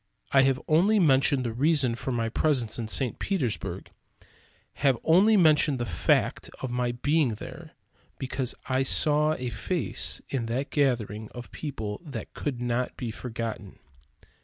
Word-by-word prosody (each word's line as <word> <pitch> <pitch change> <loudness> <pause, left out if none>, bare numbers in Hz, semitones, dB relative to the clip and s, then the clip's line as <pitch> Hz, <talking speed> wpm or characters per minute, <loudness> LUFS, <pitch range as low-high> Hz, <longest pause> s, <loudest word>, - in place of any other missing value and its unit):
I 135 - +6
have 135 -1 +2
only 185 +8 +4
mentioned 135 -5 +4
the 115 -2 -3
reason 140 -1 +2
for 130 +2 -4
my 115 -2 0
presence 120 -2 0
in 115 - -3
St. 125 +2 -1
Petersburg; 145 - -2 0.9
have 135 -3 +4
only 200 +7 +5
mentioned 155 -5 +4
the 120 - -2
fact 85 -6 +1
of 130 - -4
my 125 0 0
being 140 -1 +1
there, - - -10 0.4
because 130 -1 -2
I 130 0 +1
saw 150 +3 +2
a 125 -3 -4
face 120 - -2
in 120 -4 -2
that 130 +4 -2
gathering 110 -7 0
of 120 0 -8
people 110 -9 -5
that 145 -5 -7
could 135 -5 -3
not 120 +1 -2
be 120 -3 -4
forgotten. 115 -4 -6
130 Hz, 150 wpm, -27 LUFS, 120-150 Hz, 0.9 s, I